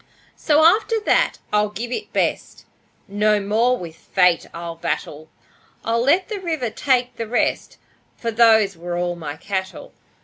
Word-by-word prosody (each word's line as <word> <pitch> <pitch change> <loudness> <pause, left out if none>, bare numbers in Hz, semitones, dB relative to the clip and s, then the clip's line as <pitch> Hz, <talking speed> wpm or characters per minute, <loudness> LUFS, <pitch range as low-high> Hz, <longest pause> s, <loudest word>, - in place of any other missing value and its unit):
So 305 0 +2
after 440 +6 +3
that - - +2 0.2
I'll 210 0 +2
give 230 +3 -6
it 425 - -5
best; - - -2 0.4
No 210 +1 +2
more 225 +5 +1
with 170 -5 -9
Fate 180 -3 +2
I'll 170 0 -7
battle. 155 -1 -4 0.6
I'll 230 +1 +1
let 325 +9 +2
the 425 -2 -5
river 320 - -3
take 250 -3 0
the 230 - -4
rest, 240 +2 -1 0.4
For 230 - -3
those 220 -3 +4
were 175 +1 -5
all 175 0 -1
my 150 -4 -6
cattle. 190 +1 -5
220 Hz, 150 wpm, -21 LUFS, 180-250 Hz, 0.6 s, those